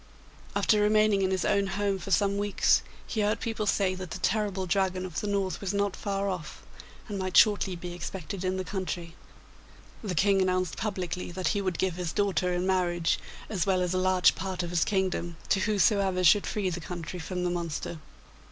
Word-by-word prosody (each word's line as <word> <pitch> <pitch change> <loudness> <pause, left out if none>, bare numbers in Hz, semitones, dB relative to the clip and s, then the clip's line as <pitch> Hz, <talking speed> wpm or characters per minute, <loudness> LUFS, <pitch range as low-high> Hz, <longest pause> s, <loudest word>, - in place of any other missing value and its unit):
After 210 -2 +3
remaining 215 -1 +4
in 190 - +2
his 190 -1 0
own 200 0 +2
home 200 0 -1
for 185 - -7
some 200 0 +2
weeks, 205 -1 +3 0.2
he 220 - -2
heard 210 +1 +1
people 220 -2 -3
say 195 -2 +2
that 185 -1 -6
the - - -5
terrible 195 -1 0
Dragon 185 0 0
of 175 -4 -4
the 210 - -3
North 195 -2 -1
was 200 0 -2
not 200 -1 0
far 200 -1 -2
off, 175 -6 -5 0.4
and 205 -3 -4
might 185 -1 0
shortly 205 -3 +5
be 175 0 -6
expected 180 +1 -6
in 185 0 0
the 185 - -2
country. 180 -2 -4 0.9
The 190 -4 -3
King 195 +3 +3
announced 185 -2 0
publicly 185 -4 -3
that 185 0 -1
he 205 - 0
would 185 -4 -2
give 185 -2 -1
his 175 -3 -3
daughter 195 -3 +1
in 180 +1 -1
marriage, 175 -3 +1 0.3
as 195 -4 -1
well 190 -1 +3
as 180 0 -1
a 185 - +1
large 185 0 +4
part 190 -1 -3
of 175 - -4
his 175 -2 +2
kingdom, 185 -4 -1
to 195 - +3
whosoever 195 -2 +2
should 200 +4 +5
free 195 -3 -1
the 175 - -3
country 175 +1 -6
from 180 +2 -4
the 175 - 0
monster. 170 -1 -4
185 Hz, 200 wpm, -28 LUFS, 180-200 Hz, 0.9 s, shortly